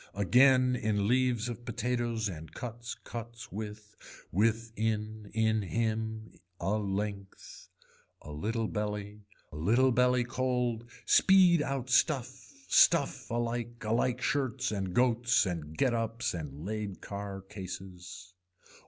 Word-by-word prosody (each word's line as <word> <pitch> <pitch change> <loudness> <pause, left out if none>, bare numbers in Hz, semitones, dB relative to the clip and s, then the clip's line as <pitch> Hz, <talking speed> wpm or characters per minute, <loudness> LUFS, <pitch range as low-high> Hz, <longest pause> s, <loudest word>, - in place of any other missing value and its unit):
Again 125 +6 +5
in 105 -3 0
leaves 125 -1 +2
of 120 -1 -6
potatoes 120 -1 -1
and 80 -4 -7
cuts, 120 -1 -6
cuts 115 0 -8
with, 105 +1 -7 0.4
with 115 +4 +1
in, 110 -1 -2
in 110 0 +2
him, 110 +2 -3 0.2
a 100 +5 0
length. 100 -1 -5 0.5
A 75 - -9
little 110 +9 -2
belly 105 0 -4 0.3
a 75 - -8
little 120 +11 +3
belly 125 0 +3
cold, 120 -2 -1 0.2
speed 185 -4 +6
out 135 -3 -3
stuff, 130 -2 +2 0.3
stuff - - +4
alike, 120 0 -3
alike 120 +3 0
shirts 130 -3 0
and 95 -3 -3
goats 120 -2 +3
and 80 -4 -5
get 130 -3 +2
ups 115 +1 -1
and 75 -2 -6
laid 105 -1 -4
car 100 -1 -6
cases. 90 -1 -9
110 Hz, 120 wpm, -31 LUFS, 100-120 Hz, 0.5 s, speed